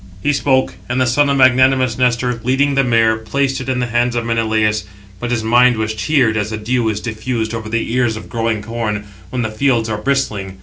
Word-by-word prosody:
He 145 - +2
spoke; 130 -2 +1 0.2
and 125 +1 0
the 130 - +3
son 140 +4 +2
of 140 - +1
magnanimous 130 -1 +4
Nestor, 125 -1 0
leading 135 +3 +1
the 135 0 +2
mare, 115 -2 +2
placed 135 +4 -1
it 130 - -6
in 130 - 0
the 125 - 0
hands 120 +1 0
of 115 -1 -1
Menelaus; 110 -2 0 0.4
but 120 - -4
his 120 -2 0
761 110 - -4
mind 125 0 +5
was 110 0 -2
cheered 120 +1 +1
762 110 - -1
as 105 0 -2
the 110 - -4
dew 115 +1 0
[is 105 -1 -2
diffused] 110 0 -3
over 110 -1 -5
the 115 0 -2
ears 120 -3 +1
of - - -9
growing 115 -3 -2
corn, 105 -2 -3 0.2
when 125 +3 -2
the 110 - -3
fields 115 -1 +1
are 105 -1 -2
bristling. 105 -8 -2
120 Hz, 230 wpm, -17 LUFS, 110-130 Hz, 0.4 s, mind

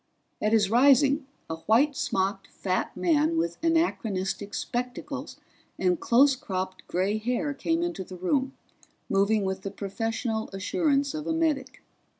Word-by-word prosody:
At 215 - +1
his 215 -3 +3
rising, 275 +3 +5 0.2
a 160 - -4
white 275 +7 +4
smocked 195 -2 -1
fat 185 -1 -2
man 165 -2 +2
with 170 +1 -1
anachronistic 210 - 0
spectacles 245 0 -4 0.4
and 180 -2 +1
close 270 +3 +5
cropped 185 -8 -5
gray 195 +4 0
hair 250 +6 -1
came 330 +4 0
into 345 - -3
the 185 0 -10
room, 265 +9 0 0.6
moving 200 +2 +3
with 190 0 -2
the 195 - -4
professional 220 +3 -3
assurance 280 - +1
of 305 -1 -5
a 320 - +1
medic. 290 -5 -1
220 Hz, 140 wpm, -27 LUFS, 190-275 Hz, 0.6 s, rising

